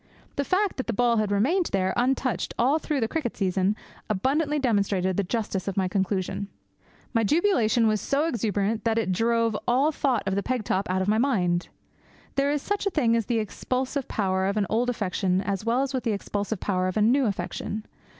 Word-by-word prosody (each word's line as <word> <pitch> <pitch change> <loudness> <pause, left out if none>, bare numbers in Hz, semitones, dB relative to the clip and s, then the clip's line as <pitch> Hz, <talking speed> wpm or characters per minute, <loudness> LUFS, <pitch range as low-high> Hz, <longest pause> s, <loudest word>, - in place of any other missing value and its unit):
The 280 - 0
fact 380 +6 +1
that 260 - -3
the 230 - -1
ball 235 +1 +2
had 215 -1 +1
remained 300 - +2
there, 190 -1 0
untouched, 250 -5 0
all 275 +6 +3
through 300 -4 -2
the 225 - +1
cricket 285 -4 -3
season 190 +1 +1 0.3
abundantly 285 +9 +1
demonstrated 200 -7 +1
the 200 - +1
justice 200 -1 -2
of 195 - -3
my 190 -1 +2
conclusion. 190 +1 -1 0.7
My 230 -2 +2
jubilation 245 - +3
was 215 -2 +2
so 285 +3 +1
exuberant 215 - -1
that 225 -1 +1
it 220 -4 +1
drove 230 +2 +1
all 265 +6 +3
thought 265 -7 0
of 195 - +1
the 200 - +1
peg 250 +1 -2
top 195 -1 -1
out 185 +1 +1
of - - -4
my 215 +1 +3
mind. 180 -10 +1 0.6
There 275 +1 +1
is 290 -1 -1
such 410 0 -1
a - - +3
thing 250 -10 +2
as 230 -3 0
the 235 - +1
expulsive 255 +5 -2
power 190 -2 0
of 200 +2 -1
an 205 - +2
old 240 +3 +2
affection 190 -4 0
as 200 +1 -2
well 240 +3 +2
as 275 - -3
the 255 -4 -1
expulsive 205 +1 -3
power 185 -2 0
of 185 - -2
a - - +3
new 255 +5 +4
affection. 210 +1 -4
225 Hz, 205 wpm, -26 LUFS, 195-260 Hz, 0.7 s, new